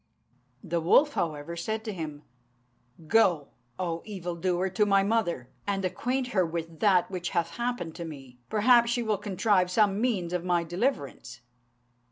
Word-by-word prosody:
The 170 Hz, -2 st, -1 dB
wolf, 285 Hz, -, +4 dB
however, 155 Hz, -, -3 dB
said 220 Hz, +6 st, -3 dB
to 220 Hz, -2 st, -4 dB
him, 155 Hz, -4 st, -6 dB, 0.8 s
"Go, 175 Hz, -6 st, +3 dB, 0.3 s
O 170 Hz, -2 st, -2 dB
evildoer, 180 Hz, -2 st, -2 dB
to 200 Hz, +3 st, +1 dB
my 195 Hz, -1 st, +4 dB
mother, 195 Hz, -, -1 dB, 0.2 s
and 195 Hz, -1 st, -1 dB
acquaint 250 Hz, +8 st, -1 dB
her 190 Hz, -6 st, +2 dB
with 165 Hz, -1 st, -5 dB
that 190 Hz, -4 st, +3 dB
which 180 Hz, -2 st, -3 dB
hath 170 Hz, 0 st, +1 dB
happened 235 Hz, -6 st, -3 dB
to 170 Hz, -, -5 dB
me; 135 Hz, -6 st, -10 dB
perhaps 235 Hz, +2 st, +5 dB
she 240 Hz, 0 st, 0 dB
will 215 Hz, -3 st, 0 dB
contrive 200 Hz, -2 st, +1 dB
some 205 Hz, +1 st, +2 dB
means 195 Hz, -9 st, 0 dB
for 180 Hz, -, +1 dB
my 175 Hz, -1 st, 0 dB
deliverance." 170 Hz, -, -3 dB
185 Hz, 155 wpm, -28 LUFS, 170-215 Hz, 0.8 s, perhaps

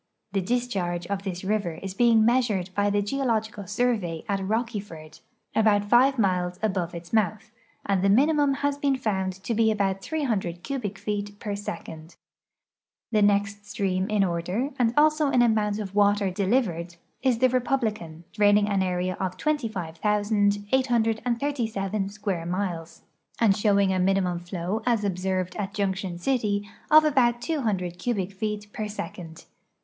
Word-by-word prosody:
The 195 Hz, 0 st, 0 dB
discharge 185 Hz, -6 st, -1 dB
of 200 Hz, +1 st, -3 dB
this 185 Hz, -2 st, -5 dB
river 200 Hz, -4 st, -1 dB
is 195 Hz, +2 st, -6 dB
being 225 Hz, +1 st, +4 dB
measured 225 Hz, -7 st, +1 dB
by 205 Hz, +1 st, +1 dB
the 205 Hz, 0 st, +1 dB
Geological 220 Hz, -4 st, -2 dB
Survey 210 Hz, -6 st, -1 dB
at 200 Hz, -2 st, 0 dB
Rocky 225 Hz, +2 st, -1 dB
ford, 155 Hz, -6 st, -11 dB, 0.4 s
about 205 Hz, -2 st, +3 dB
five 265 Hz, +3 st, +5 dB
miles 180 Hz, -4 st, 0 dB
above 185 Hz, -5 st, -1 dB
its 170 Hz, +3 st, -9 dB
mouth, 215 Hz, 0 st, 0 dB, 0.3 s
and 195 Hz, -2 st, +1 dB
the 195 Hz, -, +3 dB
minimum 285 Hz, +5 st, +4 dB
has 285 Hz, 0 st, 0 dB
been 280 Hz, -1 st, +2 dB
found 190 Hz, -6 st, -1 dB
to 235 Hz, -, -1 dB
be 225 Hz, 0 st, +3 dB
about 195 Hz, -3 st, 0 dB
300 205 Hz, -, -2 dB
cubic 225 Hz, -8 st, -4 dB
feet 205 Hz, 0 st, -4 dB
per 205 Hz, -2 st, -3 dB
second. 165 Hz, -5 st, -7 dB, 1.0 s
The 215 Hz, -2 st, +3 dB
next 205 Hz, 0 st, +1 dB
stream 195 Hz, -2 st, -1 dB
in 210 Hz, -2 st, +2 dB
order, 180 Hz, +9 st, -1 dB
and 235 Hz, -2 st, +3 dB
also 305 Hz, 0 st, +4 dB
in 250 Hz, -3 st, +4 dB
amount 215 Hz, -3 st, +2 dB
of 200 Hz, -3 st, -5 dB
water 205 Hz, -1 st, +3 dB
deliv 205 Hz, +7 st, +2 dB
ered, 170 Hz, -3 st, -6 dB, 0.3 s
is 260 Hz, -3 st, +2 dB
the 255 Hz, +2 st, +4 dB
Republican, 220 Hz, -10 st, -1 dB
draining 205 Hz, -1 st, +4 dB
an 200 Hz, -2 st, +1 dB
area 180 Hz, 0 st, -1 dB
of 185 Hz, -1 st, -3 dB
25,837 215 Hz, -, 0 dB
square 200 Hz, -5 st, -3 dB
miles, 175 Hz, -3 st, -4 dB, 0.4 s
and 215 Hz, -4 st, +4 dB
showing 200 Hz, -2 st, +3 dB
a 185 Hz, -, 0 dB
minimum 185 Hz, -2 st, +1 dB
flow, 180 Hz, +4 st, -3 dB
as 230 Hz, -3 st, +2 dB
observed 185 Hz, -1 st, -1 dB
at 200 Hz, -1 st, -4 dB
Junction 190 Hz, -3 st, -2 dB
City, 205 Hz, -1 st, 0 dB, 0.2 s
of 310 Hz, 0 st, +8 dB
about 245 Hz, -5 st, +3 dB
200 215 Hz, -, -2 dB
cubic 200 Hz, -6 st, -1 dB
feet 210 Hz, +1 st, -4 dB
per 215 Hz, -, -3 dB
second. 170 Hz, -5 st, -8 dB
205 Hz, 150 wpm, -26 LUFS, 185-230 Hz, 1.0 s, of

